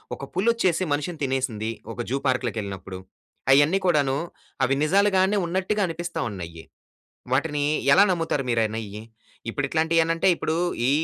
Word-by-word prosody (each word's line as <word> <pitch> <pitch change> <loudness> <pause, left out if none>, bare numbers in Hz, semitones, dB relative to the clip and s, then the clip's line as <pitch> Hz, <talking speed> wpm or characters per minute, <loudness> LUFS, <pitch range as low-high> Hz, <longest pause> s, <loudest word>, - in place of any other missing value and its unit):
ఒక - - -11
పులొచ్చేసి 190 -3 +1
మనిషిని 150 +3 -3
తినేసింది. 125 -5 -1 0.2
ఒక 120 - -5
జూ 135 - 0
పార్క్‌లోకెళ్ళినప్పుడు. 100 -7 -2 0.5
అయన్నీ 145 +8 +5
కూడాను 145 -6 +2 0.5
అవి 135 +1 +2
నిజాలుగానే 195 +3 +3
ఉన్నట్టుగా 190 +4 -1
అనిపిస్తా 170 0 -5
ఉన్నయ్యి. 85 -4 -8 0.7
వాటిని 145 +2 +1 0.3
ఎలా 195 - +7
నమ్ముతారు 165 -5 -1
మీరనేయ్యి? 110 -2 -2 0.5
ఇప్పుడు 145 +5 -2
ఇట్లాంటియనంటే 165 +2 +2
ఇప్పుడు 155 - -2 0.3
ఈ - - +4
145 Hz, 120 wpm, -24 LUFS, 120-175 Hz, 0.7 s, ఎలా